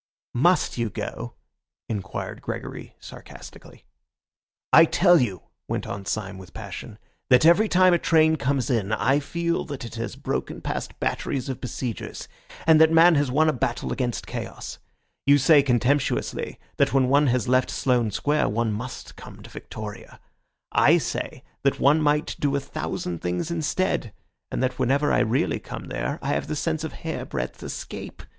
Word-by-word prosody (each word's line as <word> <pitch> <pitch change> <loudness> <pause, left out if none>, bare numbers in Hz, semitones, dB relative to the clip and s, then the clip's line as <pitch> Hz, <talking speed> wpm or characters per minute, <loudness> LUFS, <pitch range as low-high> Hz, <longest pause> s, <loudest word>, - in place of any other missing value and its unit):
"Must 170 +1 +2
you 115 -1 0
go?" - - -6 0.5
inquired 100 -3 -5
Gregory - - -6
sarcastically. - - -12 0.9
"I 165 - +10
tell 175 -1 +5
you," 95 -8 -2 0.2
went - - -2
on 100 -1 -6
Syme 100 -3 -3
with 95 -1 -13
passion, 105 +1 -8 0.3
"that 125 +3 +6
every 200 +6 +5
time 185 0 +5
a 175 - +3
train 160 -1 +4
comes 140 -2 0
in 110 -3 0
I 135 +5 +2
feel 170 +3 -2
that 140 -5 -6
it 115 - -8
has 115 - -4
broken - - -3
past - - -5
batteries 135 -1 -2
of 130 - -4
besiegers, 125 -2 -5 0.4
and 160 -1 +6
that 160 0 +6
man 165 +2 +7
has 145 -3 +2
won 155 +5 +3
a 155 - +3
battle 120 -1 -2
against 125 -3 -2
chaos. - - -6 0.5
You 140 +1 +7
say 145 +2 +6
contemptuously 135 +1 0 0.2
that - - +2
when 130 -2 +4
one 140 +2 +4
has 125 0 +1
left 130 +1 +3
Sloane 125 -4 +1
Square 145 +6 +1
one 110 +1 0
must 120 +4 -7
come - - -12
to - - -12
Victoria. 110 +1 -9 0.5
I - - +5
say - - -4 0.2
that 140 - +1
one 150 +3 +4
might 150 0 +1
do 140 -1 +1
a - - +2
thousand 90 -10 -4
things 90 - -2
instead, 160 - -1 0.4
and - - -2
that 130 0 -1
whenever 140 +4 +2
I - - +4
really 115 +4 +1
come - - -8
there 60 -2 -2
I - - -2
have - - -1
the 155 - -3
sense 160 +1 -1
of 160 - -5
hairbreadth 155 - -5
escape. - - -7
135 Hz, 165 wpm, -25 LUFS, 115-155 Hz, 0.9 s, I